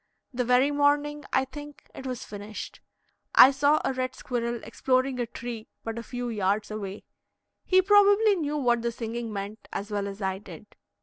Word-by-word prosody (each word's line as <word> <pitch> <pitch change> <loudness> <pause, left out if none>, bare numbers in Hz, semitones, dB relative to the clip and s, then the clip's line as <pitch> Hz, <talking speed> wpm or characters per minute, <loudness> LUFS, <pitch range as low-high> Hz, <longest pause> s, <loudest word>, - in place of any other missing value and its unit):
The 250 0 0
very 250 +4 +3
morning, 290 0 +1
I 265 - +2
think, 290 +2 -10
it 265 - -7
was 250 -2 -5
finished, 205 +1 -8 0.6
I 265 - +10
saw 285 +3 +3
a 270 - +1
red 255 0 -3
squirrel 235 -1 -3
exploring 255 0 0
a 240 - -1
tree 235 -1 -7 0.2
but 225 0 -4
a - - -4
few 245 +1 -5
yards 205 -1 0
away; 205 -2 -6 0.6
he 375 0 +4
probably 410 +1 +5
knew 300 -4 -2
what 240 -4 +2
the 235 0 -1
singing 230 0 -5
meant 205 +2 -6
as 205 +2 -5
well 200 -1 -1
as 200 0 -7
I 190 -1 -2
did. 210 +1 -13
245 Hz, 180 wpm, -27 LUFS, 215-285 Hz, 0.6 s, I